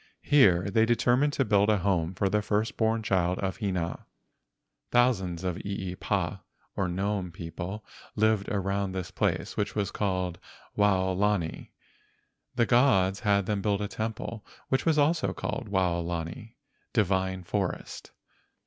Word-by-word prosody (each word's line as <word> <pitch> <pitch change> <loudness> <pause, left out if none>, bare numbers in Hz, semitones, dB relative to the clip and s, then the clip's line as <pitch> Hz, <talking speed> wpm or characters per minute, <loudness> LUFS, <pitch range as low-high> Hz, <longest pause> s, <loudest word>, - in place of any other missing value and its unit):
Here 100 -12 +5
they 115 +1 +3
determined 125 +4 +3
to 135 - +1
build 105 -1 +3
a 105 - +4
home 90 -2 0
for 100 +2 +1
the 105 +2 +1
first 105 +2 -1
born 110 0 +1
child 90 -3 +1
of 95 -1 -2
Hina. 90 -5 -3 0.8
Thousands 95 -9 +2
of 90 -2 -2
eepa 95 -2 -3 0.4
(gnome) 95 0 -1
people 85 +4 -6 0.3
lived 110 -2 +2
around 100 -1 -1
this 95 -2 -4
place, - - -1
which 100 -2 -2
was 100 -1 -1
called 90 -3 -2 0.4
Waolani. 95 -2 +1 0.9
The 120 -1 +3
gods 105 -7 +3
had 100 -2 +2
them 105 0 -1
build 100 -1 +1
a - - -2
temple 110 +1 -5 0.3
which 130 +5 0
was 160 -2 +3
also 155 +3 +2
called 120 -6 -4
Waolani 85 +2 -2 0.4
(divine 95 -4 +1
forest). 95 +1 -3
100 Hz, 130 wpm, -28 LUFS, 90-110 Hz, 0.9 s, Here